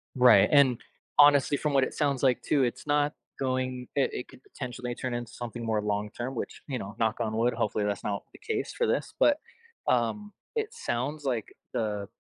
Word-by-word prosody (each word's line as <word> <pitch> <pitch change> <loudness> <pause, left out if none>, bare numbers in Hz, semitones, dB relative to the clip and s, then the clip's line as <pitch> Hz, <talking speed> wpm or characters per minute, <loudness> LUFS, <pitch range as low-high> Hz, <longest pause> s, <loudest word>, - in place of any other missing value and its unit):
Right, 125 -1 +7
and, 135 -5 +6 0.4
honestly, 145 -1 +7
from 150 0 -1
what 135 -1 +4
it - - -2
sounds 140 -3 0
like, 125 -2 +3
too, 140 -3 +2
it's 120 +4 -2
not 145 0 +2 0.2
going 130 -1 -1
it 140 - +3
it 125 - -4
could 125 - -15
potentially 125 -2 -6
turn 125 -2 -3
into 120 -1 -4
something 120 -1 -6
more 110 -2 +1
long-term, 105 +5 -3
which, - - -5
you 130 -3 -2
know, 100 +2 -7
knock 110 -1 +1
on 110 -2 -1
wood, 120 +2 +2
hopefully 105 0 0
that's 100 -1 -2
not 100 -1 -2
the - - -14
case 435 -2 -3
for 475 - +2
this, - - -1
but, 295 0 +5 0.5
um, 130 - +1 0.2
it 445 -1 0
sounds 145 - -3
like, 120 -5 0 0.3
the 105 -3 -2
125 Hz, 195 wpm, -28 LUFS, 115-145 Hz, 0.5 s, Right